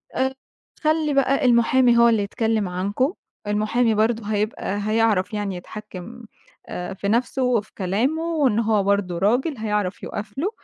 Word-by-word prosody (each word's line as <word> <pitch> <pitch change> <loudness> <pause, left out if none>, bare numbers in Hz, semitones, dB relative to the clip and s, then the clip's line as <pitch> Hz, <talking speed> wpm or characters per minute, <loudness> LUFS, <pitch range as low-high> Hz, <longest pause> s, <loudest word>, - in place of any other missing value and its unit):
آآ، 265 0 0 0.5
خَلِّي 310 -1 +2
بقى 275 -1 +2
المحامي 240 0 +4
هو 235 0 +6
اللي 220 -3 +2
يتكلم 220 -1 -1
عنكم، 200 - -1 0.3
المحامي 215 +2 +1
برضه 220 0 +1
هيبقى 205 -1 -2
هيعرف 215 -3 +2
يعني 205 -2 -2
يتحكم 210 +4 -9 0.4
آآ، 180 +2 -5
في 200 +1 -4
نفسه 245 +4 +1
وفي 235 -4 0
كلامه 225 - 0
وإن 290 -10 +1
هو 215 -3 +2
برضه 200 -3 0
راجل 245 - +1
هيعرف 210 -3 -2
يقف 210 +3 -6
له 355 +8 0
220 Hz, 145 wpm, -22 LUFS, 205-250 Hz, 0.5 s, هو